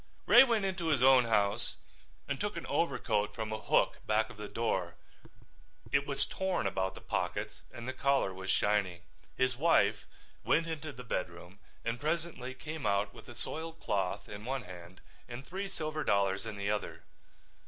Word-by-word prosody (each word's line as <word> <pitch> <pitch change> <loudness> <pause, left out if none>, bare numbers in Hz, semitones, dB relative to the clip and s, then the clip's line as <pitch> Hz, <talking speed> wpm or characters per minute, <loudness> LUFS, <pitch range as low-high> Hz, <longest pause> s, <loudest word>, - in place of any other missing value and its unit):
Ray 240 - +9
went 230 -6 +2
into 185 -3 -2
his 145 -5 +3
own 130 -2 +7
house 105 0 +1 0.5
and - - -2
took - - -2
an - - -5
overcoat 105 0 0
from 110 -1 -3
a 110 - -3
hook - - +2
back 110 +2 +2
of 115 - -13
the 105 0 -6
door. 95 -7 -1 1.0
It 140 0 +2
was 140 -1 +1
torn 190 - -1
about 95 -1 -1
the - - -10
pockets - - -2
and 120 +1 -8
the 130 - -2
collar 140 -9 +2
was 95 0 -7
shiny. 100 -4 +2 0.4
His 130 -1 +2
wife 110 -8 +3 0.4
went 165 - +3
into 160 -2 -4
the 125 -2 -10
bedroom 90 -3 -4 0.3
and 115 +1 -1
presently 155 -5 -2
came 155 -2 -4
out 100 0 +1
with - - -13
a - - -10
soiled 165 +1 -5
cloth 95 0 -1
in 105 0 -8
one 130 +1 -2
hand 90 -1 -11 0.3
and 120 +3 -7
three 195 +3 -4
silver 155 -3 -3
dollars 100 +1 +1
in 110 - -5
the 100 +1 -1
other. 105 - -3
115 Hz, 175 wpm, -32 LUFS, 100-150 Hz, 1.0 s, Ray